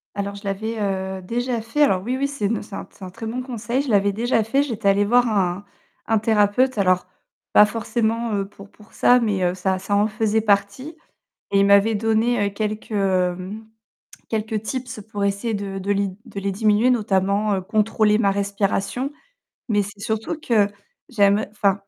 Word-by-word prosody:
Alors 200 Hz, 0 st, -3 dB
je 200 Hz, -, -11 dB
l'avais, 215 Hz, +3 st, -3 dB
heu, 190 Hz, -2 st, -2 dB
déjà 240 Hz, +4 st, -2 dB
fait. 230 Hz, +7 st, -2 dB
Alors 190 Hz, -11 st, +3 dB
oui, 250 Hz, +4 st, -2 dB
oui, 280 Hz, +1 st, 0 dB
c'est 280 Hz, -7 st, -4 dB
une 220 Hz, +3 st, 0 dB
c'est 205 Hz, -1 st, -9 dB
un -, -, -7 dB
c'est -, -, -15 dB
un 185 Hz, -, -6 dB
très 195 Hz, +5 st, -9 dB
bon 235 Hz, +3 st, -3 dB
conseil. 245 Hz, 0 st, -2 dB
Je 280 Hz, -, -5 dB
l'avais 200 Hz, -2 st, +3 dB
déjà 230 Hz, +1 st, +1 dB
fait, 230 Hz, +6 st, +1 dB
j'étais 230 Hz, -8 st, -2 dB
allée 200 Hz, +1 st, +4 dB
voir 245 Hz, +3 st, +4 dB
un 195 Hz, -3 st, 0 dB, 0.4 s
un 220 Hz, -1 st, +2 dB
thérapeute. 220 Hz, +4 st, +2 dB
Alors 185 Hz, -2 st, +2 dB, 0.4 s
pas 210 Hz, -, +7 dB
forcément, 230 Hz, +1 st, -1 dB
heu, 195 Hz, -1 st, -2 dB
pour 200 Hz, 0 st, -14 dB
pour 210 Hz, 0 st, -20 dB
ça, 250 Hz, 0 st, +5 dB
mais 205 Hz, -5 st, 0 dB
heu, 180 Hz, 0 st, +1 dB
ça 185 Hz, 0 st, -1 dB
ça 200 Hz, +2 st, -1 dB
en 205 Hz, +1 st, +3 dB
faisait 220 Hz, 0 st, 0 dB
partie. 205 Hz, +8 st, 0 dB, 0.6 s
Et 200 Hz, -, +3 dB
il -, -, +4 dB
m'avait 200 Hz, +2 st, +5 dB
donné, 225 Hz, +1 st, +1 dB
heu, 200 Hz, -, -4 dB
quelques, 215 Hz, +2 st, -4 dB
hem, 190 Hz, +1 st, -1 dB, 0.7 s
quelques 220 Hz, -1 st, -2 dB
tips 245 Hz, -1 st, -5 dB
pour 205 Hz, -2 st, -2 dB
essayer 200 Hz, +3 st, -1 dB
de 200 Hz, -2 st, -4 dB
de 195 Hz, +2 st, -1 dB
les 200 Hz, 0 st, 0 dB, 0.2 s
de 200 Hz, -, -7 dB
les 200 Hz, 0 st, -1 dB
diminuer 215 Hz, +3 st, +3 dB
notamment, 205 Hz, -2 st, +1 dB
heu, -, -, -2 dB
contrôler 215 Hz, +1 st, +2 dB
ma 200 Hz, -3 st, +3 dB
respiration. 200 Hz, +6 st, -1 dB, 0.6 s
Mais 205 Hz, -3 st, +2 dB
c'est 205 Hz, +1 st, -9 dB
surtout 220 Hz, +8 st, -3 dB
que 220 Hz, -9 st, +2 dB, 0.4 s
j'aime 205 Hz, -2 st, +3 dB
enfin 200 Hz, -2 st, +2 dB
210 Hz, 190 wpm, -22 LUFS, 200-230 Hz, 0.7 s, pas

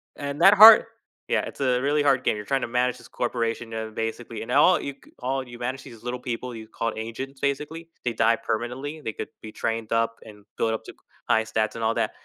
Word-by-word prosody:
And 140 Hz, 0 st, -5 dB
that 195 Hz, -, +9 dB
hard 215 Hz, +2 st, +10 dB, 0.4 s
yeah, -, -, +2 dB
it's -, -, -9 dB
a 125 Hz, -2 st, +2 dB
really 145 Hz, +2 st, +2 dB
hard 135 Hz, -3 st, +2 dB
game, -, -, +2 dB
you're 105 Hz, -, -6 dB
trying 135 Hz, +5 st, 0 dB
to -, -, -2 dB
manage 125 Hz, +1 st, 0 dB
this -, -, -15 dB
corporation, 115 Hz, -1 st, -2 dB
uh, 110 Hz, 0 st, -4 dB
basically, 115 Hz, 0 st, -4 dB
and -, -, -6 dB
all 170 Hz, +5 st, +6 dB
you 140 Hz, -, -5 dB
c -, -, -19 dB
all 135 Hz, +1 st, -1 dB
you 120 Hz, 0 st, -10 dB
manage 130 Hz, +2 st, -4 dB
these 115 Hz, -2 st, -13 dB
little 125 Hz, +1 st, -4 dB
people 125 Hz, 0 st, -5 dB
you 110 Hz, -1 st, -9 dB
call 115 Hz, +1 st, -3 dB
agents, 130 Hz, +5 st, -6 dB
basically, 150 Hz, +4 st, -3 dB, 0.2 s
they 120 Hz, -, 0 dB
die 115 Hz, +1 st, +3 dB
permanently, 125 Hz, +8 st, -4 dB
they 110 Hz, -, -4 dB
could -, -, -6 dB
be 110 Hz, -, -8 dB
trained 115 Hz, 0 st, -3 dB
up 115 Hz, 0 st, +1 dB
and 105 Hz, -2 st, -13 dB
build 115 Hz, -, +1 dB
up 110 Hz, -, -4 dB
to -, -, -8 dB
c -, -, -25 dB, 0.3 s
high 110 Hz, -2 st, +4 dB
stats 110 Hz, -1 st, -1 dB
and 115 Hz, -, -4 dB
all 110 Hz, +1 st, +2 dB
that. -, -, 0 dB
120 Hz, 240 wpm, -25 LUFS, 115-135 Hz, 0.4 s, hard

